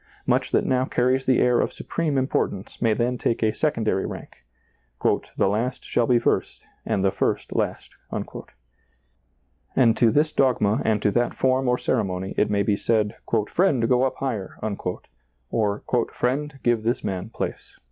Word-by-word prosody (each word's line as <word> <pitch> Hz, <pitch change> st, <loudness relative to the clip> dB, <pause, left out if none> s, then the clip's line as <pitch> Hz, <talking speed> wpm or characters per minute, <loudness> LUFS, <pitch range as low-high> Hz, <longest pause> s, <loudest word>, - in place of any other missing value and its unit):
Much -, -, +1 dB
that -, -, +2 dB
now 130 Hz, 0 st, +2 dB
car 125 Hz, -1 st, 0 dB
ries 130 Hz, +1 st, 0 dB
the 130 Hz, -, +4 dB
air 125 Hz, -1 st, +3 dB
of -, -, -1 dB
supreme 155 Hz, -4 st, -2 dB
importance 130 Hz, -7 st, -2 dB
may 115 Hz, -2 st, +3 dB
then 120 Hz, +3 st, 0 dB
take 115 Hz, -, 0 dB
a 110 Hz, -1 st, +2 dB
secondary 110 Hz, -10 st, 0 dB
rank; 60 Hz, -, -8 dB, 0.4 s
" -, -, -2 dB
the -, -, +3 dB
last 115 Hz, +6 st, -1 dB
shall 120 Hz, -, +1 dB
be 125 Hz, -, +4 dB
first, -, -, -1 dB, 0.2 s
and 95 Hz, -, +1 dB
the 95 Hz, -, +3 dB
first -, -, -1 dB
last." -, -, -2 dB, 1.8 s
And 115 Hz, -3 st, +4 dB
to 120 Hz, -, +5 dB
this 150 Hz, +6 st, +2 dB
dogma 120 Hz, -7 st, +2 dB
and 110 Hz, -2 st, +1 dB
to 105 Hz, -, +3 dB
that 120 Hz, +3 st, 0 dB
form 130 Hz, 0 st, +2 dB
or 125 Hz, -, +2 dB
ceremony 95 Hz, -7 st, -1 dB
it 105 Hz, -, +2 dB
may 100 Hz, -1 st, +1 dB
be 105 Hz, -, +2 dB
said, 110 Hz, -1 st, 0 dB, 0.2 s
" 110 Hz, -2 st, +2 dB
Friend, 145 Hz, -11 st, +2 dB
go 125 Hz, 0 st, +3 dB
up 130 Hz, 0 st, +1 dB
higher," 115 Hz, -8 st, -4 dB, 0.9 s
or 105 Hz, -2 st, 0 dB
" 115 Hz, -, 0 dB
Friend, 135 Hz, +3 st, -1 dB
give 120 Hz, -2 st, +2 dB
this 115 Hz, +3 st, -1 dB
man 95 Hz, +1 st, -3 dB
place." -, -, -6 dB
120 Hz, 175 wpm, -24 LUFS, 105-130 Hz, 1.8 s, to